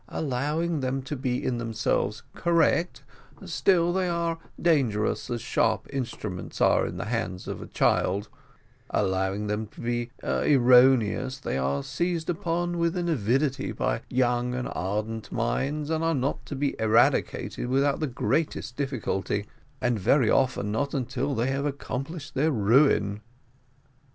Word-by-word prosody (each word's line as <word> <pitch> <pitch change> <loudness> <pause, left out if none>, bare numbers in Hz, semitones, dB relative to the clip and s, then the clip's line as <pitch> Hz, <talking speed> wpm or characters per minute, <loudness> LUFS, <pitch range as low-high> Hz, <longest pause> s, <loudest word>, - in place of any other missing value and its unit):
Allowing 150 +4 -1
them 130 0 -2
to 145 - -4
be 125 -2 -2
in 120 -2 0
themselves 110 -2 -1
correct, 170 -4 +1 0.4
still 175 0 +2
they 185 -1 0
are 170 -1 -1 0.2
dangerous 130 -11 +1
as 120 -1 -3
sharp 110 -2 +1
instruments 110 -8 -5
are - - +4
in - - -6
the - - -4
hands 105 -5 -3
of - - -5
a - - -8
child; 100 +3 +1 0.6
allowing 95 +2 0
them 105 +1 -2
to - - -17
be 120 0 -2
erroneous, 130 -1 +4
they 135 - -4
are 70 +1 0
seized 175 -1 -1
upon 175 +1 -2
with 170 +1 +1
an 175 -1 -1
avidity 135 +1 0
by - - -1
young 125 0 +1
and 125 - -2
ardent 105 +3 -3
minds, 145 - -1
and 160 0 0
are 165 0 +2
not 135 +1 -1
to 145 - -5
be 140 +1 -1
eradicated 110 +2 +2
without 135 +2 +2
the 155 - 0
greatest 140 +1 -1
difficulty, 115 -7 -2 0.4
and 120 -3 +1
very 115 +4 +3
often 125 -6 +1
not 140 +7 -1
until 135 +2 -1
they 115 +1 0
have 140 +2 -1
accomplished 140 +2 -5
their 140 +4 +2
ruin." 110 -4 +3
130 Hz, 145 wpm, -27 LUFS, 110-150 Hz, 0.6 s, are